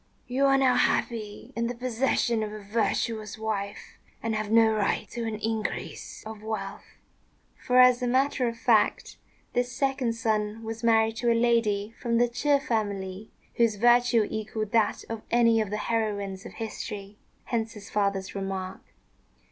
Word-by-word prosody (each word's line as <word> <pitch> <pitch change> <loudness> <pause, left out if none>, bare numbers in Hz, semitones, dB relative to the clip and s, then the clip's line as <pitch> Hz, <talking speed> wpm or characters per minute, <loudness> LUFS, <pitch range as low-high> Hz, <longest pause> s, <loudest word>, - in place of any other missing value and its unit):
You 260 +3 +1
are 270 0 +5
now 265 -2 +4
happy 215 -4 -1
in 230 0 0
the 245 - -4
possession 240 -1 0
of 215 -1 -3
a 215 -1 -8
virtuous 215 0 -1
wife, 205 -2 -4 0.2
and 225 0 -1
have 215 -1 -2
no 225 0 +5
right 210 -2 0
to 235 -1 -4
an 220 - -2
increase 220 0 -4
of 215 -1 -8
wealth." 210 -2 -6 0.6
For, 250 - 0
as 250 0 +7
a 250 - 0
matter 260 0 +2
of 230 0 -3
fact, 230 -2 +2 0.4
this 245 0 0
second 265 -4 0
son 220 -1 -1
was 225 +1 -6
married 225 -1 +3
to 240 0 +2
a 230 - +3
lady 225 -3 +1
from 235 -2 +1
the 240 +1 +4
Ch'ê 280 +4 +2
family 205 -6 -3 0.3
whose 230 -3 +3
virtue 240 0 +4
equalled 215 -1 -4
that 225 -2 +2
of 225 -1 -5
any 230 -1 +4
of 215 - -2
the 210 - -2
heroines 205 -3 -2
of - - -12
history: 210 -2 -6 0.3
hence 230 -1 -2
his 210 -3 -11
father's 200 -2 0
remark. 195 -1 -4
225 Hz, 165 wpm, -27 LUFS, 210-235 Hz, 0.6 s, as